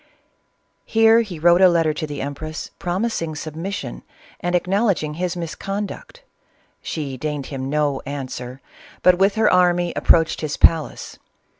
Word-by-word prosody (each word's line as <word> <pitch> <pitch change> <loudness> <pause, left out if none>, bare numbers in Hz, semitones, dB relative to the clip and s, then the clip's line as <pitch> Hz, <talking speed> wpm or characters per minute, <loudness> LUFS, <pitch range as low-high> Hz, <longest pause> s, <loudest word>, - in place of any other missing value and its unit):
Here 225 +1 +4
he 200 -7 -6
wrote 175 +3 +4
a 185 - +8
letter 165 -3 +2
to 155 0 -4
the 145 -1 -5
empress, 155 +3 -6
promising 175 -3 -2
submission 160 +6 -5 0.4
and 175 0 -1
acknowledging 185 -4 +1
his 180 +2 -3
misconduct. 195 - -6 0.6
She 140 -5 -4
deigned 150 0 -3
him 135 -1 -5
no 145 -2 0
answer, 130 -2 -6 0.4
but 180 0 +5
with 195 +2 +3
her 220 -3 +3
army 175 -1 +3
approached 165 -1 +3
his 155 -2 -3
palace. 160 -3 +2
165 Hz, 135 wpm, -21 LUFS, 150-185 Hz, 0.6 s, a